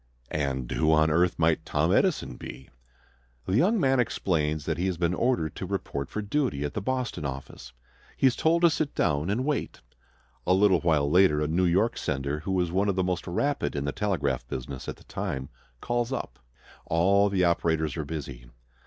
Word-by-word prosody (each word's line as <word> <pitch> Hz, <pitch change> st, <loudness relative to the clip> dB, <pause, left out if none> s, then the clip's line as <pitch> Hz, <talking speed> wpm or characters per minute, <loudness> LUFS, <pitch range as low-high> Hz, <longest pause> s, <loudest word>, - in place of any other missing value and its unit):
"And 65 Hz, -4 st, -2 dB
who 80 Hz, 0 st, +2 dB
on 80 Hz, 0 st, +4 dB
earth 85 Hz, +2 st, +2 dB
might 80 Hz, -1 st, +2 dB
Tom -, -, +1 dB
Edison -, -, +1 dB
be?" 65 Hz, -, -10 dB, 0.8 s
The 95 Hz, -, 0 dB
young 200 Hz, -, +3 dB
man 135 Hz, -4 st, +3 dB
explains 80 Hz, -9 st, 0 dB
that 80 Hz, 0 st, -2 dB
he 90 Hz, -, +1 dB
has 90 Hz, -3 st, -2 dB
been 85 Hz, 0 st, +1 dB
ordered 90 Hz, -, 0 dB
to -, -, -4 dB
report 70 Hz, -1 st, -3 dB
for 105 Hz, -, -4 dB
duty 110 Hz, -, -1 dB
at 75 Hz, -, -4 dB
the 105 Hz, -, -3 dB
Boston 125 Hz, -5 st, -2 dB
office. 65 Hz, -2 st, -7 dB, 0.5 s
He -, -, +1 dB
is 130 Hz, -, +4 dB
told 170 Hz, +2 st, +2 dB
to 170 Hz, -, +7 dB
sit 155 Hz, -2 st, -2 dB
down 75 Hz, +4 st, +1 dB
and 120 Hz, +6 st, 0 dB
wait. 150 Hz, -1 st, -2 dB, 0.7 s
A 90 Hz, -, +5 dB
little 95 Hz, -2 st, +4 dB
while 80 Hz, -4 st, +2 dB
later 90 Hz, -1 st, +4 dB
a 75 Hz, -, 0 dB
New 85 Hz, +4 st, +1 dB
York 95 Hz, +7 st, +2 dB
sender, 70 Hz, +2 st, -2 dB
who 95 Hz, +4 st, -1 dB
is 85 Hz, -2 st, -2 dB
one 95 Hz, +3 st, +1 dB
of 100 Hz, -, 0 dB
the 95 Hz, -, +1 dB
most 90 Hz, 0 st, -2 dB
rapid 140 Hz, -, -1 dB
in 70 Hz, 0 st, -2 dB
the 70 Hz, -, -1 dB
telegraph 90 Hz, -11 st, -1 dB
business 65 Hz, +1 st, -6 dB
at -, -, -5 dB
the -, -, -19 dB
time, 65 Hz, 0 st, -4 dB, 0.3 s
calls 120 Hz, +1 st, -1 dB
up. 125 Hz, -, -4 dB, 0.5 s
All 100 Hz, +5 st, +3 dB
the 95 Hz, -2 st, +1 dB
operators 80 Hz, -3 st, +1 dB
are 80 Hz, -, -2 dB
busy. 70 Hz, -5 st, -7 dB
85 Hz, 195 wpm, -27 LUFS, 75-105 Hz, 0.8 s, to